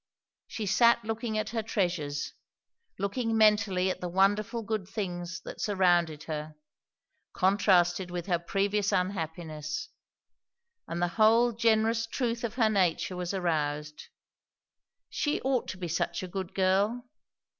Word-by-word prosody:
She 220 - -5
sat 235 +3 +4
looking 225 0 -2
at 215 0 -2
her 230 -1 -1
treasures, 175 -9 -2 0.6
looking 225 +3 -1
mentally 210 -4 +3
at - - -7
the 180 - -3
wonderful 205 +5 +1
good 210 -3 -3
things 180 -4 -4
that - - -8
surrounded 175 -6 +2
her, 155 -1 -5 0.8
contrasted 185 -2 +3
with 175 -1 -4
her 175 -3 +1
previous 200 +3 0
unhappiness; 175 - -3 1.0
and 170 +1 -2
the - - +3
whole 230 +3 +5
generous 225 0 +2
truth 235 -1 -2
of 235 -1 -3
her 230 -4 +3
nature 185 -3 +1
was 180 -1 -3
aroused. 150 -4 -2 1.0
She 295 - -1
ought 260 -2 0
to 185 - -5
be 180 -2 -4
such 165 +3 -2
a - - -4
good 185 0 -6
girl! 200 +6 +1
195 Hz, 135 wpm, -29 LUFS, 175-220 Hz, 1.0 s, whole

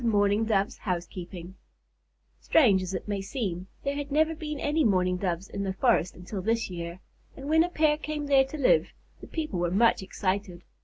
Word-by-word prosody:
MOURNING 205 -1 +2
DOVE'S 200 -2 0
HOUSEKEEPING 175 -1 -5 0.9
Strange 215 -12 +4
as 185 +1 -4
it 185 - -5
may 200 -1 -2
seem, 195 -5 -4 0.2
there 280 - -1
had 285 0 -5
never 315 +2 +3
been 300 -2 -5
any 300 +2 +1
Mourning 185 -5 +2
Doves 180 0 -2
in 200 - -5
the 195 -1 -2
forest 195 -4 +2
until 185 +2 -6
this 225 0 0
year, 170 0 -6 0.4
and 275 0 -7
when 320 +2 +5
a 350 - -2
pair 305 -3 +2
came 300 -1 -4
there 275 -2 +5
to 270 +3 -7
live, 300 - +4 0.3
the - - -11
people 305 - -3
were 175 0 +1
much 220 +5 +3
excited. 190 -1 -3
205 Hz, 190 wpm, -27 LUFS, 185-285 Hz, 0.9 s, when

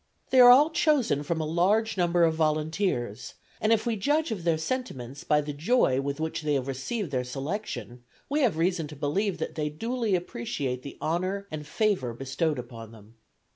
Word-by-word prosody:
They 260 - +5
are 245 -1 +10
all 285 +6 +7
chosen 290 - +2
from 160 +3 -2
a 155 - -1
large 195 +8 +2
number 175 -2 +2
of 165 -1 +4
volunteers; 155 - -1 0.3
and 215 - +2
if 225 0 +3
we 235 -2 0
judge 295 +8 +1
of 195 -6 -4
their 165 -2 +2
sentiments 150 - -4
by 150 0 +3
the 145 0 -5
joy 145 - +2
with 140 +2 -3
which 160 +1 -2
they 150 -1 0
have 135 -1 -1
received 145 - -3
their 130 -2 0
selection, 135 - -5 0.3
we 290 +2 0
have 240 - +2
reason 170 -1 0
to 150 - -10
believe 175 +7 -1
that 160 - -4
they 150 -1 -2
duly 225 +5 -1
appreciate 125 -5 -3
the 140 - -9
honor 185 +5 -1
and 150 -1 -6
favor 180 - 0
bestowed 135 +4 -1
upon 115 -3 -8
them. 110 -1 -16
160 Hz, 190 wpm, -27 LUFS, 140-210 Hz, 0.3 s, are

